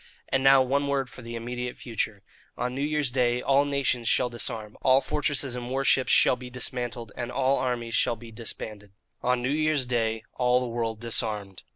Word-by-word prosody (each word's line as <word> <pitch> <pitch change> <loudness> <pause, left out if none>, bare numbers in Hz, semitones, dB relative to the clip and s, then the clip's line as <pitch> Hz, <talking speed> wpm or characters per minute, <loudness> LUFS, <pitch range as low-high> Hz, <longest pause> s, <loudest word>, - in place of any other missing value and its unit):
"And 135 0 +1
now 135 -1 +7
one 140 +2 0
word 135 -2 -1
for 135 - -10
the 115 0 -7
immediate 125 +1 -4
future. 110 -3 -3 0.3
On 125 0 -2
New 135 - -3
Year's 150 -3 0
Day 125 -1 +2
all 140 +2 +3
nations 140 -4 0
shall 125 - +2
disarm, 110 -2 -4
all 130 0 +5
fortresses 140 -2 0
and 120 0 -5
war 135 +1 0
ships 130 -1 +3
shall - - +5
be 125 0 -9
dismantled, 120 -2 -4
and 120 0 -4
all 135 +1 +2
armies 120 -2 -2
shall 120 - +2
be 115 0 -12
disbanded. 105 -3 -7 0.3
"GOLIAH." 125 - +1
On 125 - -1
New 125 - 0
Year's 155 -2 +2
Day 115 -2 0
all 125 0 +3
the 125 - -2
world 115 -2 -3
disarmed. 105 -4 -2
125 Hz, 200 wpm, -27 LUFS, 115-135 Hz, 0.3 s, now